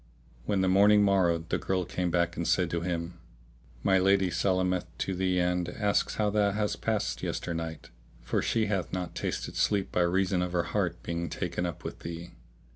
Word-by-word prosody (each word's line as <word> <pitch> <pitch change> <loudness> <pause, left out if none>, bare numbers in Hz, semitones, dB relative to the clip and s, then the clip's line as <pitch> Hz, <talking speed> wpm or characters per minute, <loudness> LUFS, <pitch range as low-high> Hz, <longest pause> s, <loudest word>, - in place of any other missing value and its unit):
When 100 -2 +1
the 95 - +2
morning 105 +2 +6
morrowed 85 -4 +2
the - - 0
girl 95 -1 -1
came 90 +1 -2
back 85 0 +1
and 85 - -2
said 90 -3 +2
to 85 - -1
him, 85 0 -3 0.6
"My 95 -1 +4
lady 95 -1 +3
salameth 90 0 +1
to 95 - -2
thee 95 0 0
and 90 -1 0
asks 105 +2 0
how 105 -1 +1
thou 105 -1 +3
hast 105 +1 -2
passed 110 -2 -1
yesternight; 80 -4 -4 0.3
for - - -1
she 115 -2 +1
hath 95 -5 -1
not 90 -1 -3
tasted - - -3
sleep 100 -2 +1
by 90 - +1
reason 90 +1 +2
of 90 0 -2
her 85 -1 +2
heart - - -1
being 85 0 -3
taken 90 -1 -2
up 85 - -7
with - - -6
thee. 85 +1 -7
90 Hz, 190 wpm, -29 LUFS, 85-100 Hz, 0.6 s, morning